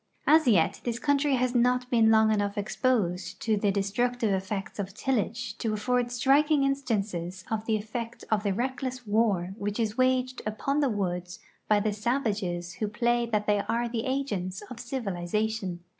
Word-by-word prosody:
As 315 -2 +5
yet 185 -9 +3
this 235 -1 -2
countiy 285 0 +2
has 250 0 0
not 250 +1 +2
been 225 -2 +5
long 220 0 +5
enough 205 -1 0
exposed 195 -4 0
to 220 -1 +2
the 205 0 +1
de 200 0 0
structive 240 +3 0
effects 195 +2 -4
of 195 0 -4
tillage 230 -3 -1
to 220 -2 -1
afford 245 +3 0
striking 275 +4 +3
instances 200 -10 -2
of 220 0 -2
the 220 - +2
effect 230 +2 -6
of 215 -1 +3
the 205 -1 0
reckless 255 +3 -3
war 205 -4 +1
which 205 +2 -3
is 220 +1 -1
waged 255 0 +2
upon 220 +7 -1
the 285 -3 +2
woods 180 -4 -3 0.3
by 210 -1 +4
the 210 0 0
sav 240 +6 -1
ages 175 -5 -2
who 215 - 0
play 235 +3 +1
that 210 -2 0
they 210 -1 +2
are 235 +1 +1
the 235 +1 -3
agents 205 -9 -2
of 240 - -7
civilization. 210 -5 -2
220 Hz, 175 wpm, -28 LUFS, 200-250 Hz, 0.3 s, As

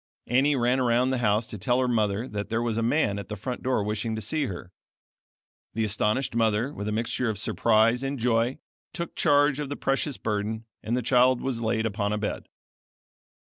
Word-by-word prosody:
Annie 135 +4 +3
ran 125 +1 +2
around 125 +1 +2
the 130 - 0
house 110 -1 +2
to 105 - -8
tell 125 +6 +1
her 130 - +2
mother 110 -1 0
that 105 -2 -5
there 115 +1 0
was 115 -2 -1
a 115 - 0
man 115 -4 +1
at 100 - -8
the 105 - -4
front 125 +5 -5
door 130 -5 0
wishing 110 +2 -2
to 110 - -4
see 145 +6 -1
her. 90 -2 -7 1.0
The 110 - 0
astonished 105 +5 0
mother, 115 +3 +1
with 105 - -5
a - - -1
mixture 115 +2 -1
of 105 - -2
surprise 115 +3 +2
and 135 +1 -2
joy, 120 +1 +1 0.4
took 170 -2 -5
charge 145 0 +3
of 145 -2 -3
the 145 - -3
precious 135 0 -1
burden 110 +1 -3 0.2
and 115 +3 -1
the 125 - -2
child 125 +1 +4
was 130 -3 -3
laid 110 0 0
upon 105 -1 -1
a - - 0
bed. 105 0 -4
115 Hz, 205 wpm, -26 LUFS, 105-130 Hz, 1.0 s, child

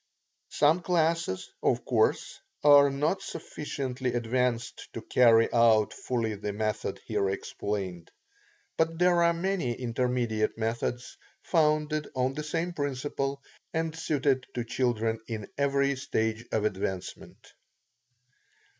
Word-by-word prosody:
Some 155 +4 +3
classes, 165 - 0
of - - +1
course, - - +1 0.2
are 145 -1 +8
not 145 +7 0
sufficiently 135 -5 -4
advanced 120 0 -1
to - - -5
carry 115 -2 +5
out 115 -3 +4
fully 115 -3 -2
the 105 0 -4
method 110 0 -2
here 100 - 0
explained. 95 -2 -4 0.7
But 165 0 +1
there 175 0 +4
are 170 0 +5
many 170 -6 -1
intermediate 120 -3 -1
methods, 115 +2 -3 0.3
founded 155 -2 +1
on 130 +1 +1
the 150 - -4
same 165 +3 -2
principle, 140 -1 -3 0.3
and 160 0 -1
suited 140 -5 0
to 120 - -1
children 115 -2 0
in 110 -3 -5
every 140 0 +1
stage 110 -2 -2
of 110 -1 0
advancement. 95 -2 -5
125 Hz, 115 wpm, -28 LUFS, 115-150 Hz, 0.7 s, are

